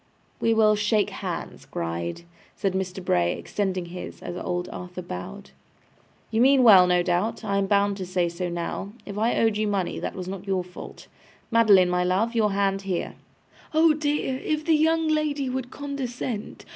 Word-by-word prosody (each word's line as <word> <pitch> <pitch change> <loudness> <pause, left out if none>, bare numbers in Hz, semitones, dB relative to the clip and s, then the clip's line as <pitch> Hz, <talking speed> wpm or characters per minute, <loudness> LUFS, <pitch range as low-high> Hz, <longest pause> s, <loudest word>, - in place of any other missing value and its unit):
'We 225 0 +2
will 215 -1 +5
shake 210 0 +1
hands, - - -6
Gride,' 85 - -4 0.3
said 195 -2 -1
Mr. 190 -1 -3
Bray, 85 - +2
extending 190 -3 -2
his, 180 +1 -8
as 175 - -5
old 180 0 -3
Arthur 180 0 -7
bowed. 90 - -8 0.8
'You 225 +1 +2
mean 265 0 +6
well, 190 -6 +8
no 180 0 +3
doubt. 180 +7 -1
I 200 -2 0
am 195 - 0
bound 200 0 +2
to 190 - -4
say 180 -1 +1
so 175 +1 -4
now. 175 +4 -4
If 205 0 -5
I 225 +2 +1
owed 225 -2 +2
you 215 0 0
money, 195 -3 -1
that - - -4
was 185 -1 -6
not 195 +1 -6
your 190 -2 0
fault. 180 0 -11 0.5
Madeline, 205 -6 +5
my 180 0 +1
love, 195 +6 +1
your 215 -3 +2
hand 195 -1 +1
here.' 190 -3 -3 0.6
'Oh 320 0 +6
dear! 295 -3 -1
If 305 0 -1
the 330 - +3
young 320 +1 +3
lady 300 -4 0
would 255 -1 -3
condescent! 255 -6 -5
200 Hz, 180 wpm, -25 LUFS, 180-235 Hz, 0.8 s, well